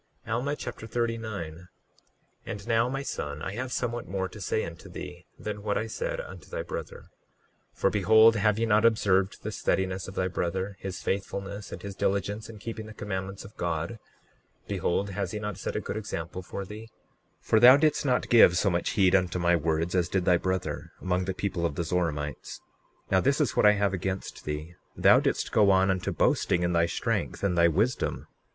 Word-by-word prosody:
Alma 125 +6 -1
Chapter 110 - -7
39 110 -8 -3
39:1 90 +3 -14 0.8
And 105 +2 -6
now, 115 +1 +2
my 135 +1 -3
son, 75 - -4
I 95 - -3
have 125 +3 -4
somewhat 120 -1 -2
more 95 0 -2
to 105 - -11
say 110 +4 0
unto 85 -1 -10
thee - - -9
than 105 -1 -5
what 105 0 -1
I 110 - -1
said 110 - -3
unto 90 -3 -9
thy - - -3
brother; - - -7 0.6
for - - +2
behold, 110 +3 +6
have 105 0 +2
ye 115 - +1
not 105 -1 +3
observed 100 -4 +2
the 110 - -3
steadiness 95 -2 -1
of 95 - -9
thy 95 - 0
brother, 95 +2 -2
his 95 -2 -6
faithfulness, 100 0 -3
and - - -8
his 100 -1 -6
diligence 100 +3 -1
in 110 - -9
keeping 110 +1 -6
the 110 - -11
commandments 95 -1 -5
of 100 - -13
God? 85 +5 -2 0.7
Behold, 100 +3 -1
has 95 -2 -3
he 105 - -3
not 105 -2 -5
set - - -4
a - - +1
good - - -4
example 90 -4 -5
for 95 +2 -6
thee? 110 +3 -9 0.5
39:2 - - -28
For 110 - +4
thou 125 +4 +9
didst 150 0 +2
not 125 -3 +1
give 100 -7 +7
so 100 +1 +2
much 85 0 0
heed 95 -2 +5
unto 90 -2 +2
my 85 0 +3
words 80 +1 0
as 90 -2 +1
did 95 -1 0
thy 90 -2 +5
brother, 95 +1 -3
among 90 0 0
the 95 0 -3
people 95 -4 -2
of 80 -4 0
the 85 - -1
Zoramites. 80 -4 -2 0.5
Now 95 - +4
this 140 +3 +2
is 145 -8 +1
what - - +5
I 105 - +7
have 100 -1 +1
against 95 +1 -4
thee; 75 +3 -4 0.2
thou - - +6
didst - - -1
go 105 -2 +5
on 95 0 +4
unto 95 -1 -1
boasting 90 - +2
in 90 0 +1
thy 85 0 +3
strength 85 - -2
and 95 -3 +1
thy 85 0 +5
wisdom. 105 +10 0
95 Hz, 205 wpm, -28 LUFS, 90-110 Hz, 0.8 s, thou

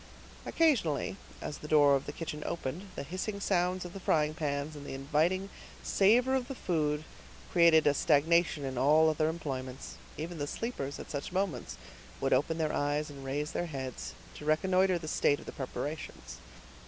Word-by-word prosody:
Occasionally, 165 - +2 0.3
as 145 - -5
the 150 - -8
door 145 -2 +6
of 135 - -2
the - - -3
kitchen 150 -2 -5
opened, 170 +5 -4
the - - -4
hissing 185 +7 -4
sounds 180 -2 +1
of 175 - -8
the 195 - -6
frying 155 -4 +2
pans 150 -1 -2
and 145 - -8
the 140 - -6
inviting 160 +8 +1 0.3
savor 240 +7 +4
of 260 -2 0
the 270 - -5
food 155 -7 0 0.5
created 170 -3 +6
a 145 - +5
stagnation 160 +1 +3
in 130 -2 -3
all 155 +4 +5
other 155 0 +1
employments; 135 -5 -5 0.2
even 165 +1 -5
the 145 - -2
sleepers, 145 - -4
at - - -9
such 140 +2 -4
moments, 190 0 -2 0.4
would 135 - +1
open 150 +5 +2
their 155 -2 0
eyes, 145 +1 0
and 140 -1 -10
raise 145 +3 -2
their 175 - -2
heads, 130 -5 -5 0.2
to - - -10
reconnoiter 185 +4 +3
the 160 -2 -7
state 145 -1 +2
of - - -12
the - - -6
preparations. 145 +3 -6
155 Hz, 180 wpm, -31 LUFS, 145-175 Hz, 0.5 s, door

